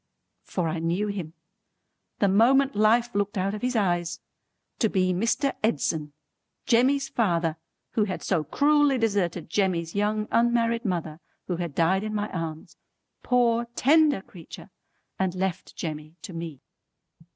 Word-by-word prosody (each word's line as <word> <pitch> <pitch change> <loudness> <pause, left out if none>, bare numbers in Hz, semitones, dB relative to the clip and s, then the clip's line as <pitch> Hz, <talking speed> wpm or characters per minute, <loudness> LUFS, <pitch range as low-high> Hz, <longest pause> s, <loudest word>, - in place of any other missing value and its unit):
For 180 -3 -2
I 160 +1 -2
knew 175 +6 -1
him, 180 -6 -5 0.8
the 200 - +2
moment 260 +7 +4
life 230 +3 +3
looked 205 +1 -1
out 195 +2 0
of 210 - -5
his 250 0 -1
eyes, 175 -5 0 0.6
to 220 - +3
be 185 -2 +1
Mr. 230 +8 0
Edson, 150 -6 0 0.5
Jemmy's 265 +3 +3
father 170 -7 0 0.3
who 215 - +1
had 190 -3 -5
so 170 -5 +1
cruelly 290 - +3
deserted 200 -7 0
Jemmy's 175 -3 0
young 210 +1 0
unmarried 235 0 +2
mother 170 -5 -2 0.3
who 180 - -2
had 170 -5 -4
died 185 +4 +2
in 215 0 -3
my 210 0 -1
arms, 160 -3 -6 0.4
poor 235 -1 +2
tender 295 -5 +4
creetur, 175 +2 -12 0.5
and 190 -1 0
left 185 -1 -3
Jemmy 155 -1 -6
to 185 - -8
me. 165 -5 -6
195 Hz, 140 wpm, -26 LUFS, 170-230 Hz, 0.8 s, moment